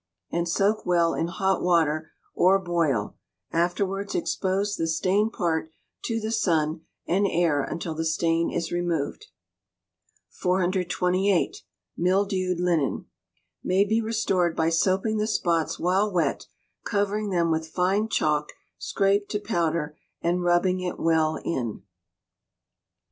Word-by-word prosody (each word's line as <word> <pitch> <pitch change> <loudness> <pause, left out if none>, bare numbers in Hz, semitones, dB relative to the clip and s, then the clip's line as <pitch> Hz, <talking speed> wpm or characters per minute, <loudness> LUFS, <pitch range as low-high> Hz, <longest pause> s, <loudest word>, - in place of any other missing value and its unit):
and 170 0 -1
soak 200 +5 +1
well 170 -2 +2
in 165 - -1
hot 190 +2 0
water, 160 -3 +2 0.2
or 190 +2 +4
boil; 165 - -1 0.4
afterwards 190 +4 -1
expose 195 +3 -1
the 165 - -1
stained 190 +7 +1
part 165 -6 -1 0.3
to 225 -1 -1
the 220 0 -3
sun 160 -7 +1 0.2
and 195 +3 +2
air 165 -5 +2
until 165 +3 -4
the 160 +1 -3
stain 165 +1 +1
is 170 - -3
removed. 175 -4 -2 1.0
428. 185 +1 +1 0.4
Mildewed 185 0 +1
Linen 170 -6 0 0.6
may 190 +2 +3
be 220 +3 +1
restored 195 -7 0
by 160 0 +2
soaping 190 +6 +1
the 210 - 0
spots 170 -7 0
while 190 +4 +1
wet, 175 -3 0 0.4
covering 205 0 -1
them 170 -3 +1
with 160 0 -1
fine 190 +6 0
chalk 150 -6 0 0.3
scraped 200 +1 +1
to 210 - -1
powder, 165 -7 -1 0.2
and 175 +1 0
rubbing 175 +1 +2
it 180 -1 -4
well 160 -1 +2
in. 120 - -3
180 Hz, 125 wpm, -25 LUFS, 165-195 Hz, 1.0 s, or